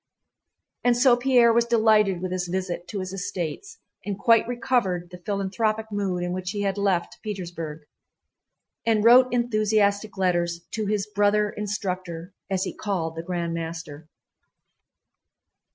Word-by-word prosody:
And 245 Hz, -1 st, +3 dB
so 250 Hz, 0 st, +6 dB
Pierre 245 Hz, -2 st, +4 dB
was 235 Hz, 0 st, +3 dB
delighted 215 Hz, -5 st, +3 dB
with 185 Hz, -, -3 dB
his 180 Hz, -1 st, -2 dB
visit 180 Hz, -1 st, -3 dB
to 200 Hz, -, -4 dB
his 185 Hz, 0 st, -6 dB
estates 185 Hz, -, -5 dB, 0.3 s
and 200 Hz, -2 st, -3 dB
quite 230 Hz, 0 st, +4 dB
recovered 220 Hz, -8 st, -1 dB
the 180 Hz, -, -10 dB
philanthropic 215 Hz, +2 st, -1 dB
mood 195 Hz, -3 st, -1 dB
in 175 Hz, 0 st, -2 dB
which 185 Hz, 0 st, -4 dB
he 205 Hz, +1 st, -3 dB
had 195 Hz, -1 st, 0 dB
left 195 Hz, -4 st, -1 dB
Petersburg, 170 Hz, -7 st, -6 dB, 1.0 s
and 220 Hz, -2 st, +2 dB
wrote 255 Hz, +2 st, +7 dB
enthusiastic 215 Hz, -3 st, +1 dB
letters 175 Hz, -2 st, 0 dB
to 215 Hz, -2 st, -2 dB
his 205 Hz, -1 st, 0 dB
"brother 210 Hz, 0 st, +2 dB
instructor" 185 Hz, -5 st, -4 dB, 0.2 s
as 190 Hz, -1 st, 0 dB
he -, -, -4 dB
called 170 Hz, -6 st, -3 dB
the 165 Hz, -, -4 dB
Grand 170 Hz, -1 st, -3 dB
Master. 160 Hz, -2 st, -6 dB
200 Hz, 140 wpm, -25 LUFS, 180-215 Hz, 1.0 s, wrote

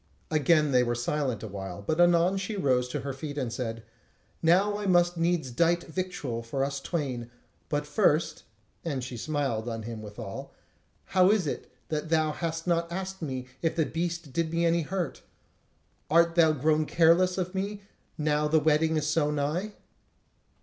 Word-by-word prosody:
Again 155 Hz, -1 st, +3 dB
they 125 Hz, -1 st, +5 dB
were 120 Hz, -1 st, 0 dB
silent 125 Hz, -2 st, -1 dB
awhile, 100 Hz, -2 st, -6 dB
but 155 Hz, +10 st, +1 dB
anon 175 Hz, +2 st, +4 dB
she 195 Hz, +3 st, -3 dB
arose 130 Hz, -7 st, +2 dB
to 125 Hz, -, -4 dB
her 140 Hz, -1 st, -4 dB
feet 145 Hz, +2 st, -6 dB
and 125 Hz, -5 st, -2 dB
said: 115 Hz, -2 st, -4 dB, 0.6 s
"Now 200 Hz, +5 st, +3 dB
must 175 Hz, -1 st, +4 dB
I 165 Hz, -, -4 dB
needs 170 Hz, -6 st, +1 dB
dight 170 Hz, +6 st, +2 dB
victual 160 Hz, -9 st, -4 dB
for 135 Hz, +4 st, -2 dB
us 140 Hz, 0 st, -3 dB
twain; 135 Hz, -6 st, -3 dB, 0.4 s
but 145 Hz, 0 st, -1 dB
first" 150 Hz, +2 st, +1 dB, 0.4 s
(and 140 Hz, -6 st, -2 dB
she 125 Hz, 0 st, -6 dB
smiled 120 Hz, -3 st, -2 dB
on 115 Hz, -1 st, -4 dB
him 115 Hz, -1 st, -6 dB
withal), 105 Hz, -1 st, -8 dB, 0.5 s
"how 185 Hz, 0 st, +4 dB
is 210 Hz, -4 st, +3 dB
it 145 Hz, -, -4 dB, 0.2 s
that 155 Hz, 0 st, -2 dB
thou 155 Hz, -1 st, +2 dB
hast 165 Hz, +1 st, -3 dB
not 170 Hz, -1 st, 0 dB
asked 190 Hz, +1 st, -4 dB
me 130 Hz, -5 st, -4 dB, 0.2 s
if 165 Hz, -1 st, 0 dB
the 160 Hz, -2 st, +2 dB
beast 170 Hz, -3 st, -3 dB
did 165 Hz, -1 st, 0 dB
me 170 Hz, 0 st, +1 dB
any 170 Hz, 0 st, +3 dB
hurt? 170 Hz, -2 st, -3 dB, 0.9 s
Art 170 Hz, +2 st, +4 dB
thou 165 Hz, -2 st, +5 dB
grown 155 Hz, +1 st, +1 dB
careless 175 Hz, +3 st, +4 dB
of 180 Hz, 0 st, -2 dB
me, 200 Hz, +1 st, -3 dB, 0.3 s
now 150 Hz, -1 st, +1 dB
the 155 Hz, +1 st, +4 dB
wedding 155 Hz, +1 st, +2 dB
is 150 Hz, -, 0 dB
so 150 Hz, 0 st, +2 dB
nigh?" 150 Hz, +8 st, -1 dB
155 Hz, 170 wpm, -28 LUFS, 135-170 Hz, 0.9 s, they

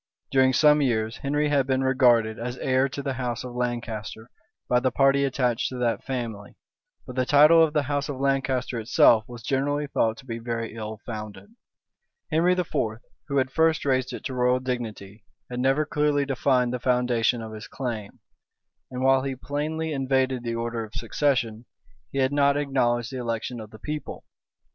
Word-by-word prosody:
During 130 Hz, -1 st, +4 dB
some 150 Hz, +3 st, +5 dB
years, 110 Hz, -4 st, 0 dB
Henry 145 Hz, +2 st, 0 dB
had 140 Hz, -2 st, +2 dB
been 130 Hz, 0 st, +1 dB
regarded 120 Hz, -4 st, +3 dB
as 120 Hz, +2 st, -4 dB
heir 130 Hz, +1 st, +1 dB
to 140 Hz, +1 st, -6 dB
the 135 Hz, -1 st, -2 dB
house 120 Hz, -1 st, -3 dB
of 125 Hz, -1 st, -7 dB
Lancaster 120 Hz, -2 st, -4 dB, 0.4 s
by 125 Hz, -, +3 dB
the 130 Hz, +1 st, +1 dB
party 135 Hz, +2 st, +3 dB
attached 125 Hz, -2 st, 0 dB
to 130 Hz, -, -7 dB
that 120 Hz, -2 st, -1 dB
family; 115 Hz, -6 st, -5 dB, 0.5 s
but 125 Hz, -, -9 dB
the 130 Hz, -, +2 dB
title 150 Hz, +5 st, +6 dB
of 155 Hz, -2 st, +1 dB
the 150 Hz, -2 st, +2 dB
house 145 Hz, +1 st, -2 dB
of 135 Hz, -2 st, -4 dB
Lancaster 135 Hz, -3 st, 0 dB
itself 115 Hz, -1 st, +5 dB
was 120 Hz, -1 st, -10 dB
generally 145 Hz, +2 st, 0 dB
thought 115 Hz, -5 st, 0 dB
to 130 Hz, -, -13 dB
be 115 Hz, -2 st, -5 dB
very 115 Hz, -1 st, -4 dB
ill 110 Hz, -1 st, -6 dB
founded. 110 Hz, -, -8 dB, 0.8 s
Henry 170 Hz, +3 st, +3 dB
IV., 180 Hz, -1 st, -1 dB, 0.6 s
who 140 Hz, -1 st, -1 dB
had 130 Hz, -1 st, +1 dB
first 160 Hz, 0 st, +2 dB
raised 130 Hz, -2 st, +1 dB
it -, -, -7 dB
to 135 Hz, -, -4 dB
royal 125 Hz, 0 st, +2 dB
dignity, 115 Hz, -5 st, -5 dB, 0.3 s
had 125 Hz, -, -3 dB
never 135 Hz, +4 st, +2 dB
clearly 150 Hz, -1 st, +1 dB
defined 130 Hz, -2 st, +1 dB
the 125 Hz, -, -2 dB
foundation 125 Hz, -2 st, +1 dB
of 110 Hz, 0 st, -8 dB
his 110 Hz, 0 st, -8 dB
claim; 115 Hz, -6 st, -5 dB, 0.7 s
and 130 Hz, 0 st, -4 dB
while 135 Hz, 0 st, +4 dB
he 135 Hz, 0 st, -3 dB
plainly 155 Hz, +4 st, -3 dB
invaded 130 Hz, -2 st, 0 dB
the 115 Hz, -1 st, -3 dB
order 115 Hz, 0 st, -3 dB
of 110 Hz, -1 st, -11 dB
succession, 120 Hz, -2 st, -1 dB, 0.5 s
he -, -, -5 dB
had 130 Hz, +1 st, +2 dB
not 140 Hz, 0 st, +3 dB
acknowledged 125 Hz, -4 st, 0 dB
the 130 Hz, -, -5 dB
election 115 Hz, 0 st, -3 dB
of 110 Hz, -1 st, -9 dB
the 110 Hz, -, -13 dB
people. 150 Hz, +7 st, -6 dB
130 Hz, 180 wpm, -25 LUFS, 120-140 Hz, 0.8 s, title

